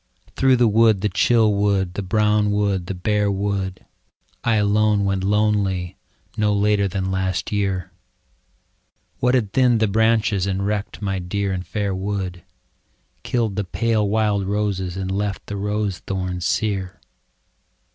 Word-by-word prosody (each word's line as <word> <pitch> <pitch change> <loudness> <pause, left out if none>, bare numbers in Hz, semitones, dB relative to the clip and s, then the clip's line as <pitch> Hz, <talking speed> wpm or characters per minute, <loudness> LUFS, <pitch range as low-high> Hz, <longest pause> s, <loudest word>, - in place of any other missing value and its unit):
Through 135 -1 +4
the 120 -1 +3
wood, 110 -2 +4
the 105 - +1
chill 110 -2 +3
wood, 100 -3 +1
the 100 - -3
brown 105 +1 +2
wood, 100 -3 0
the 95 - -4
bare 105 +3 0
wood, 95 -1 -2 0.6
I 115 -2 +2
alone 105 0 +2
went 95 -1 0
lonely 100 -3 +1 0.4
no 105 -1 +1
later 100 0 +2
than 95 0 -2
last 95 -1 -2
year, 100 -4 -1 1.3
What 125 +1 +2
had 110 -6 0
thinned 125 -3 +3
the 110 - +2
branches, 110 -2 +2
and 100 0 -1
wrecked 105 0 -3
my 95 -1 -1
dear 100 +2 -2
and 90 -1 -3
fair 100 -2 -2
wood. 95 -2 -3 0.8
Killed 115 -5 -1
the 105 - -1
pale 110 +2 0
wild 105 -2 +1
roses 100 -3 -2
and 95 -1 -3
left 100 0 -2
the 105 - -6
rose 105 -1 -2
thorns 95 -2 -3
sere 95 -3 -2
100 Hz, 145 wpm, -21 LUFS, 95-105 Hz, 1.3 s, Through